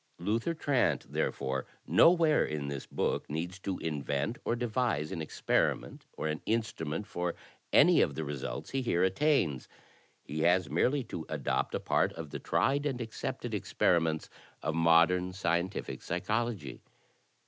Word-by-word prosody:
"Luther 115 - -1
Trant, 125 - +1
therefore, 65 -1 -1 0.2
nowhere 165 -3 +5
in 75 -2 -3
this 70 -2 -5
book - - -1
needs 85 +5 -4
to 95 -1 -3
invent 75 - -2
or 115 - 0
devise 120 - -1
an 85 - -3
experiment 80 - -1
or - - -3
an 75 0 -2
instnunent 105 -6 -1
for 90 -3 -3 0.4
any - - +6
of - - +1
the 80 - -2
results 70 -3 -5
he 135 - 0
here 90 -8 +1
attains; 95 - +2 0.6
he 75 +2 -5
has 85 -1 +3
merely 130 - +2
to 80 -8 -7
adopt - - -1
a - - 0
part - - +1
of 80 -3 -8
the - - -4
tried 140 +2 +1
and 130 -3 -2
accepted 120 +1 -4
experiments 80 -5 +1 0.4
of 80 - 0
modern, 85 +3 +4
scientific 90 0 -2
psychology. 105 - -2
90 Hz, 145 wpm, -31 LUFS, 80-120 Hz, 0.6 s, any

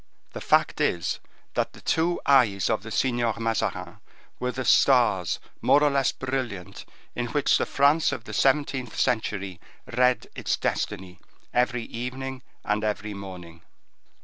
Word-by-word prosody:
The - - -6
fact - - +2
is, 85 - 0 0.3
that - - -1
the - - -14
two 170 +2 +1
eyes 115 -8 +4
of 110 - 0
the 110 - -9
Signor 120 -2 0
Mazarin 115 -1 -2 0.4
were 125 0 -1
the 130 0 -4
stars 120 - +4 0.2
more 145 - +4
or 145 - +4
less 135 -1 +2
brilliant 120 -8 -4 0.3
in 120 0 -2
which 145 +4 +2
the - - 0
France 145 +3 +3
of 120 - -5
the - - -9
seventeenth 135 -3 +1
century 100 -6 -1 0.3
read 125 0 +3
its - - -1
destiny 90 -1 -3 0.3
every 125 -1 +1
evening 130 +3 -5 0.2
and 105 +1 0
every 105 0 -2
morning. 90 -4 -9
120 Hz, 145 wpm, -26 LUFS, 100-130 Hz, 0.4 s, eyes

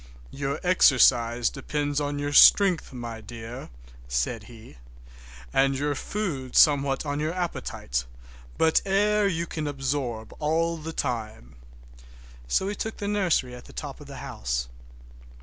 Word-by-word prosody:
"Your 140 +1 -3
exercise 120 -9 +4
depends 145 +1 -2
on 145 0 -2
your 145 0 -3
strength, 185 +1 +6
my 120 -3 -7
dear," 115 +2 -9 0.4
said 65 - -2
he, 115 - -14 0.7
"and 135 0 +3
your 145 +1 0
food 145 -6 -4
somewhat 140 -2 +4
on 145 0 -2
your 155 +3 -2
appetite; 60 - -3 0.5
but 160 0 +3
air 205 +1 +2
you 170 -3 -1
can 155 -2 -4
absorb 135 -5 -3
all 165 +2 0
the 160 +1 -6
time." 110 - -4 0.9
So 125 - +1
we 200 - -2
took 220 +2 -5
the 205 - -4
nursery, 185 -11 +1
at 125 0 -11
the - - -14
top - - -7
of - - -11
the - - -9
house. - - -3
140 Hz, 140 wpm, -26 LUFS, 120-165 Hz, 0.9 s, strength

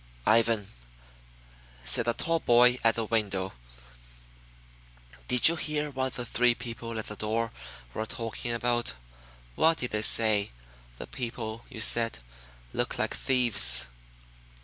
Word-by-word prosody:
"Ivan," 115 -2 +2 1.2
said 60 - +1
the 120 - +1
tall 165 +5 -1
boy 125 -1 +4
at 115 -1 +3
the 115 - -2
window, 100 -4 -2 1.7
"did 125 - +6
you 170 - +4
hear 150 -1 -3
what 130 -1 -3
the 120 - -5
three 120 0 +2
people 115 -1 -7
at 110 - -4
the 105 - -4
door 115 +2 -2 0.4
were 110 +1 -4
talking 115 +1 -5
about? 120 - 0 0.6
What 160 - +2
did 125 - -3
they 105 - 0
say? 110 - +3 0.4
The - - -7
people 115 -2 -6
you 120 -5 -7
said 115 - +4 0.6
looked - - -2
like - - -1
thieves." 110 - +3
115 Hz, 130 wpm, -27 LUFS, 110-125 Hz, 1.7 s, did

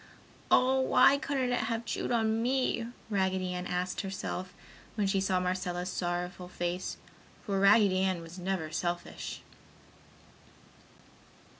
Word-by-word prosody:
"Oh, 260 +1 +4
why 260 +1 +5
couldn't 265 -4 -1
it 245 -2 +1
have 230 0 -2
chewed 215 - -2
on 225 -1 +2
me?" 250 -2 0 0.2
Raggedy 190 -2 0
Ann 180 0 -4
asked 180 +1 -2
herself 190 -2 -4 0.4
when 210 -2 +1
she 195 0 +1
saw 190 -1 +1
Marcella's 180 0 -2
sorrowful 180 +1 -3
face, 175 +1 -3 0.5
for 200 -3 0
Raggedy 200 -1 +5
Ann 190 -2 +1
was 165 +3 -10
never 180 -4 -2
selfish. 175 +1 -3
190 Hz, 125 wpm, -30 LUFS, 180-225 Hz, 0.5 s, why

